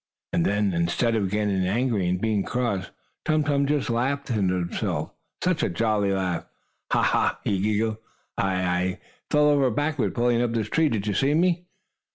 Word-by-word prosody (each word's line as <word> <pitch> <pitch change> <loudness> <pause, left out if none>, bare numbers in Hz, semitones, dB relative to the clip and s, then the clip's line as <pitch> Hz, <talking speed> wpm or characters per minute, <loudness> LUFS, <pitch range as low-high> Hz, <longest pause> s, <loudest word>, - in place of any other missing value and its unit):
And 85 - +2
then, 100 -1 +1
instead 85 +8 +1
of 100 -4 0
getting 100 -2 0
angry, 110 -2 +1
and 90 0 0
being 110 -1 +1
cross, 115 -7 -2 0.3
Tum 155 -1 +2
Tum 140 -1 +1
just 145 -1 0
laughed 130 +5 -1
himself, 90 -6 -1 0.3
such 180 -3 +1
a - - +1
jolly 105 -3 +1
laugh! 90 -3 -1 0.4
"Ha! - - +3
Ha!" - - +2
he 100 - 0
giggled. 110 +2 0 0.4
"I 95 -1 0
I 90 +1 0 0.3
fell 150 0 +4
over 140 -3 +4
backward 145 +2 -1
pulling 120 0 +2
up 120 -1 0
this 110 -3 -1
tree. 160 -1 +2
Did 105 -5 -2
you 105 - 0
see 135 +8 +2
me?" 175 +1 +1
110 Hz, 175 wpm, -25 LUFS, 95-140 Hz, 0.4 s, fell